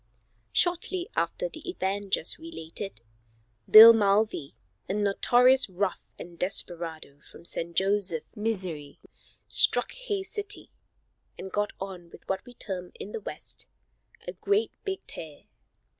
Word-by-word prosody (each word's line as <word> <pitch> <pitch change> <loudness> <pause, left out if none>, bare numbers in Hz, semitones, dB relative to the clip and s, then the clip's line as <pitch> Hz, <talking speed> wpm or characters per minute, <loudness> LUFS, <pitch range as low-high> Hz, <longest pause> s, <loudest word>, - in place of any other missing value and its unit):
Shortly 355 +1 0
after - - -1
the 320 -6 -7
event 200 - -3
just 160 - +2
related, 195 - -6 0.7
Bill 225 +2 +12
Mulvey, 205 - +1 0.3
a 195 - -1
notorious 245 +5 +3
rough 185 0 -3
and 170 -1 -10
desperado 165 -6 -3
from 170 - -16
St. 170 0 -5
Joseph, 190 -3 0
Mo., 185 -10 -4 0.5
struck - - +5
Hays 415 -6 -4
City, 415 -3 -3 0.7
and 190 - -8
got 210 0 -1
on 185 -3 -8
what 190 0 -3
we 245 - -10
term 180 -5 -4
in 205 - -7
the - - -5
West, - - -8 0.6
"a - - -4
great 410 +2 0
big 385 -1 -4
tear." 155 -3 -10
200 Hz, 125 wpm, -27 LUFS, 175-265 Hz, 0.7 s, Bill